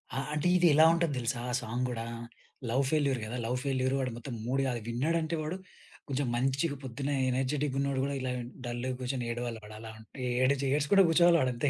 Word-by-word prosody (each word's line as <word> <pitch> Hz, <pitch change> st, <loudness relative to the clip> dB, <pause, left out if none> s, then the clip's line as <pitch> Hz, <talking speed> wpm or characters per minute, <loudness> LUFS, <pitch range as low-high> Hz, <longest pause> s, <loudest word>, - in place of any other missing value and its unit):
ఆ! -, -, -2 dB, 0.2 s
అంటే 150 Hz, +3 st, 0 dB
ఇది 175 Hz, -1 st, +5 dB
ఎలా 155 Hz, +2 st, +7 dB
ఉంటాది 170 Hz, -3 st, +1 dB
దెలుసా 120 Hz, +1 st, -2 dB
ఆ -, -, -3 dB
సాంగ్ 120 Hz, +3 st, -2 dB
గూడా 115 Hz, -2 st, -4 dB, 0.6 s
లవ్ 130 Hz, +4 st, +2 dB
ఫెయిల్యూరు 140 Hz, -5 st, +2 dB
గదా! 120 Hz, +3 st, -4 dB
లవ్ 125 Hz, +2 st, 0 dB
ఫెయిల్యూరు 130 Hz, -1 st, 0 dB
వాడు 130 Hz, -2 st, -1 dB
మొత్తం 120 Hz, +2 st, -7 dB
మూడు 135 Hz, +3 st, +1 dB
గాదు, 120 Hz, -2 st, -1 dB
విన్నాడంటే 160 Hz, +7 st, 0 dB
వాడు 155 Hz, +4 st, -3 dB, 0.5 s
కొంచెం 135 Hz, 0 st, 0 dB
మంచిగా 135 Hz, +5 st, 0 dB
పొద్దున్నే 135 Hz, +3 st, -3 dB, 0.2 s
ఎనర్జిటిక్ 135 Hz, +2 st, 0 dB
ఉన్నోడు 140 Hz, -1 st, 0 dB
గూడా 140 Hz, +1 st, -1 dB
ఇలా 130 Hz, -1 st, -2 dB
విన్ 120 Hz, 0 st, -6 dB
డల్‌గా 120 Hz, +2 st, -3 dB
గూర్చొని 125 Hz, -1 st, -2 dB
ఏడవాలి 120 Hz, -1 st, -4 dB
వాడు 105 Hz, +1 st, -10 dB
అలా 110 Hz, 0 st, -8 dB
ఉం 110 Hz, -, -13 dB, 0.2 s
ఏడ్చి 130 Hz, +3 st, +2 dB
ఏడ్చుకుంట 150 Hz, +7 st, +4 dB
కూర్చోవాలి 170 Hz, +1 st, +5 dB
ఆడు 130 Hz, -1 st, +2 dB
అంతే 120 Hz, +4 st, 0 dB
130 Hz, 200 wpm, -30 LUFS, 120-145 Hz, 0.6 s, ఎలా